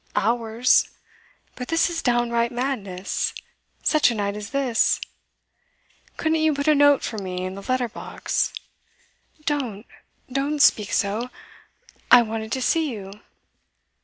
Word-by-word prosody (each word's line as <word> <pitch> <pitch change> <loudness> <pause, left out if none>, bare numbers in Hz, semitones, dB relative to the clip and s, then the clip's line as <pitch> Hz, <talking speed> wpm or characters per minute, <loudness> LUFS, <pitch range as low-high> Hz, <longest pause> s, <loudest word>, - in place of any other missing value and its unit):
Hours? 230 +2 +2 0.7
But 250 - -6
this 330 0 +2
is 340 -2 -3
downright 240 -1 +1
madness 220 -8 -2 0.5
such 305 -4 +4
a 235 - -2
night 200 -1 -2
as 210 0 -6
this! 260 -3 +1 1.2
Couldn't 320 0 +1
you 315 -2 +2
put 285 +1 -3
a 305 - +6
note 285 -1 +5
for 220 - -4
me 185 -1 -4
in 185 - -4
the 195 - -8
letter 255 +3 0
box?' 220 - -2 0.9
'Don't 245 -8 -2 0.5
don't 280 +3 -1
speak 210 -6 +4
so! 215 +4 0 0.8
I 240 - +8
wanted 220 0 -5
to 260 - -1
see 320 +4 +1
you. 200 -5 -7
240 Hz, 135 wpm, -23 LUFS, 210-280 Hz, 1.2 s, I